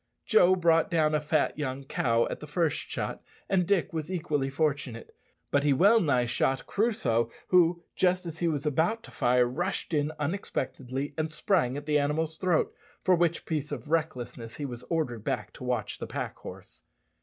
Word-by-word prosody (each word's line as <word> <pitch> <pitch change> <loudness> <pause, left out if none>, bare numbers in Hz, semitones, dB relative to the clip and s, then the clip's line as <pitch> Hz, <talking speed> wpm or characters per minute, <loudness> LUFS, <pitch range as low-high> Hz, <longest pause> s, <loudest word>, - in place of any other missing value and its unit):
Joe 185 -4 +5
brought 165 -2 +3
down 155 -2 +2
a 150 - +2
fat 150 0 0
young 135 -1 -3
cow 115 -3 +1
at - - -4
the 150 - -9
first 160 0 +1
shot, - - -4 0.3
and 180 -3 +2
Dick 195 -4 +1
was 160 +1 -3
equally 150 -6 -1
fortunate. 135 -5 -2 0.4
But 145 0 +3
he 145 -1 +4
well 200 - +6
nigh 135 -7 +2
shot 130 +2 0
Crusoe, 125 - +1 0.2
who, 170 -1 +4
just 180 0 +2
as 165 -1 -6
he 170 - +1
was 150 -2 -1
about 165 +10 +1
to - - -12
fire, 125 0 +3
rushed 175 +8 -2
in 150 0 +1
unexpectedly 140 -4 -3
and 155 0 0
sprang 160 -6 +1
at 145 - -6
the 150 -1 +3
animal's 155 +2 -1
throat, 180 -4 +1 0.3
for 185 - +4
which 170 -1 +1
piece 150 -2 -2
of 145 +1 -6
recklessness 125 -8 -2
he 145 - -4
was 120 -3 -6
ordered 135 -10 -1
back - - -3
to - - -10
watch 125 -3 -2
the - - -5
pack - - -4
horse. - - -11
150 Hz, 185 wpm, -28 LUFS, 135-170 Hz, 0.4 s, well